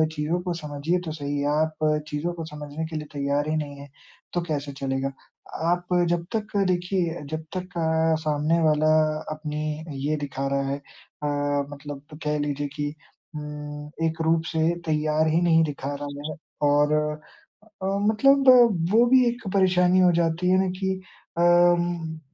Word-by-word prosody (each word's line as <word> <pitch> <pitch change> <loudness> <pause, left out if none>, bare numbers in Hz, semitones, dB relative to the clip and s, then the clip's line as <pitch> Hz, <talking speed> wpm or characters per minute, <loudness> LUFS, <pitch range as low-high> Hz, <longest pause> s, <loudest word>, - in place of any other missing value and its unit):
चीज़ों 155 +4 -1
को 180 -1 -2
समझिए 155 +2 -2
तो 160 - -3
सही 145 -2 -3
है। 140 - 0
आप 155 -1 0
चीज़ों 155 +3 -2
को 165 -2 -6
समझने 150 0 -6
के 160 0 -7
लिए 150 -1 -4
तैयार 145 +1 0
ही 155 - 0
नहीं 145 -2 -3
है, 140 - -10 0.5
तो 175 - 0
कैसे 145 -2 -2
चलेगा? 135 0 -1 0.6
आप 175 0 0 0.2
जब 170 0 0
तक 215 -1 -3
देखिए 180 -2 0
जब 155 0 -3
तक 180 -1 -6
अ, 160 0 +2
सामने 155 +2 +1
वाला 155 -1 +3 0.4
अपनी 155 0 -4 0.2
ये 155 - +1
दिखा 135 0 -3
रहा 140 0 0
है 140 - -1
अ, 145 +1 -10 0.4
मतलब 145 0 -9 0.2
कह 150 0 0
लीजिए 145 0 -2
कि 145 -1 -2 0.4
उम, 150 0 -7 0.2
एक 160 0 -3
रूप 160 0 +3
से 160 - -1 0.3
तैयार 155 0 +1
ही 160 +2 +2
नहीं 165 -2 +4
दिखा 145 -2 -3
रहा 145 0 -6
है। - - -6 0.3
और 145 +1 +3
अ, 155 +7 -5 0.2
मतलब 275 +5 +4
वो 250 -2 +9 0.3
वो 235 - +7
भी 255 0 +6
एक 240 -2 -3
परेशानी 185 -1 +4
हो 180 -1 +6
जाती 165 +2 0
है 185 - +5
न - - -1
कि 190 -1 0 0.5
अम 175 -2 +3
155 Hz, 165 wpm, -25 LUFS, 150-175 Hz, 0.6 s, वो